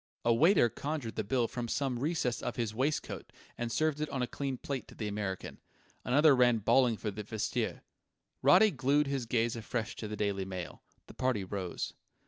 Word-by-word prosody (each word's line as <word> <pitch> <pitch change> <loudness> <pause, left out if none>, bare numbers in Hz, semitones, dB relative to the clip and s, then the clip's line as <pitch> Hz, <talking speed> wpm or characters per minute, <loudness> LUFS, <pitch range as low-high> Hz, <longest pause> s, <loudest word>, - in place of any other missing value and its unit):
A 115 - +5
waiter 160 - +5
conjured 140 0 -4
the 110 - -1
bill 120 +3 +1
from 120 0 -4
some 130 0 -1
recess 135 -5 0
of - - -3
his 115 -4 -2
waistcoat 135 +7 -2 0.2
and 120 -1 -3
served 155 +2 +1
it 155 - -1
on 130 -2 -1
a - - +2
clean 135 +2 -3
plate 135 0 -4
to - - -14
the 110 - -3
American. 100 -2 -4 0.4
Another 145 +4 +5
ran 125 -2 +5
bawling 120 +2 +3
for 105 - -3
the 105 +2 -6
vestiaire. 105 +1 -2 0.6
Roddy 220 -1 +6
glued 145 +2 +2
his 135 -4 -2
gaze 115 0 +1
afresh 115 0 -3
to 110 - -5
the 105 0 -5
Daily 100 -2 0
Mail. 95 -3 -6 0.2
The - - -13
party 125 -6 0
rose. 95 -2 -4
120 Hz, 190 wpm, -32 LUFS, 110-140 Hz, 0.6 s, Roddy